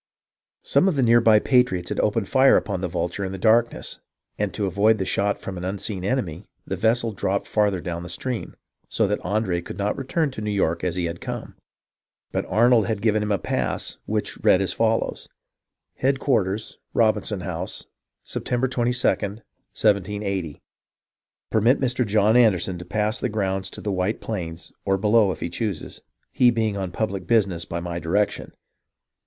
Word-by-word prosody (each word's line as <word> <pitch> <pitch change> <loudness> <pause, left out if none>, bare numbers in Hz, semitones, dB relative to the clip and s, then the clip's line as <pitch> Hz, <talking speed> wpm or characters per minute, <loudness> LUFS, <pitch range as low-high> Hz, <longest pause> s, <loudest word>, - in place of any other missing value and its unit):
Some 190 - +3
of 185 - +2
the 135 - +2
near 120 0 +5
by 110 -2 +6
patriots 105 -7 +2
had - - -2
opened 105 -1 +1
fire 135 0 +5
upon 95 -3 -2
the 95 - -1
Vulture 90 +2 -3
in 95 - -3
the 95 - -5
darkness, 115 +4 +2 0.4
and 105 -2 -1
to 105 - -1
avoid 100 +4 +3
the 95 - -2
shot 100 +2 0
from 95 -2 -6
an - - -7
unseen 95 0 -3
enemy, 95 -6 -2 0.2
the 95 - -3
vessel 115 +4 +1
dropped 100 -1 -1
farther 105 -3 +1
down 85 -1 -4
the 90 - -8
stream, 120 +7 -4 0.3
so - - +1
that - - 0
Andre 95 -2 0
could 85 - -8
not 105 0 -1
return 140 +3 -1
to 120 - -7
New 105 - -2
York 95 -5 0
as 90 -2 -1
he 90 -1 -1
had 85 0 -5
come. - - -6 0.8
But - - -2
Arnold 115 -2 +4
had 110 -2 -2
given 110 -1 +2
him 105 0 -1
a 100 - +3
pass - - -2
which - - -3
read 90 - +5
as 95 - 0
follows: 115 0 0 0.3
— - - -61
HE.A.D 135 +1 +2
Qlarters 110 -6 0 0.2
Robinson 110 -3 +1
House - - -5 0.4
Sep' - - -5
22* 125 +1 -1
1780 105 - -1 0.9
Permit 115 +5 +3
Mr. 125 -1 +1
John 105 +2 +3
Anderson 95 -7 +3
to 90 - -8
pass 110 +2 0
the 125 - -1
grounds 95 -3 -1
to - - -9
the 105 - -2
White 95 +3 -1
Plains 85 -6 -5
or 95 0 +1
below 105 0 +4
if 90 - -7
He 85 - -2
chooses. 105 -8 -4 0.3
He 125 - +5
being 110 -3 0
on 95 -2 -3
public 95 -2 -3
Business 95 -7 +2
by 85 - -4
my 85 0 -4
Direction. 95 +6 -1
105 Hz, 180 wpm, -24 LUFS, 95-115 Hz, 0.9 s, by